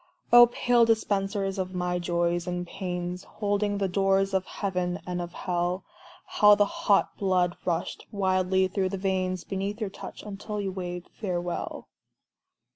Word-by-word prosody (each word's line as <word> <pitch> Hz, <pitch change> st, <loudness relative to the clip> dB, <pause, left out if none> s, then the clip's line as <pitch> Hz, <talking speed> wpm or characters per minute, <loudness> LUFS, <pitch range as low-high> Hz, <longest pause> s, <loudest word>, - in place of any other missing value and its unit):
Oh, 240 Hz, 0 st, +10 dB
pale 240 Hz, 0 st, +3 dB
dispensers 200 Hz, -3 st, 0 dB
of 185 Hz, 0 st, -3 dB
my 180 Hz, 0 st, -1 dB
Joys 175 Hz, 0 st, 0 dB
and 180 Hz, 0 st, -2 dB
Pains, 180 Hz, -1 st, -4 dB
Holding 205 Hz, -1 st, -1 dB
the 200 Hz, -1 st, 0 dB
doors 195 Hz, +1 st, +2 dB
of 190 Hz, -1 st, +1 dB
Heaven 180 Hz, -3 st, -2 dB
and 180 Hz, 0 st, -3 dB
of 175 Hz, 0 st, -5 dB
Hell, 180 Hz, +1 st, -1 dB, 0.4 s
How 210 Hz, 0 st, +6 dB
the 205 Hz, -, +4 dB
hot 200 Hz, 0 st, +1 dB
blood 180 Hz, -3 st, +1 dB
rushed 170 Hz, -2 st, -2 dB
wildly 190 Hz, -1 st, +2 dB
through 190 Hz, 0 st, -1 dB
the 195 Hz, -, -3 dB
veins 185 Hz, -1 st, -1 dB
Beneath 195 Hz, +2 st, -3 dB
your 210 Hz, -4 st, -3 dB
touch, -, -, -9 dB
until 210 Hz, +1 st, -5 dB
you 195 Hz, -1 st, -2 dB
waved 180 Hz, -1 st, -6 dB
farewell. 175 Hz, -4 st, -4 dB
190 Hz, 150 wpm, -27 LUFS, 180-200 Hz, 0.4 s, Oh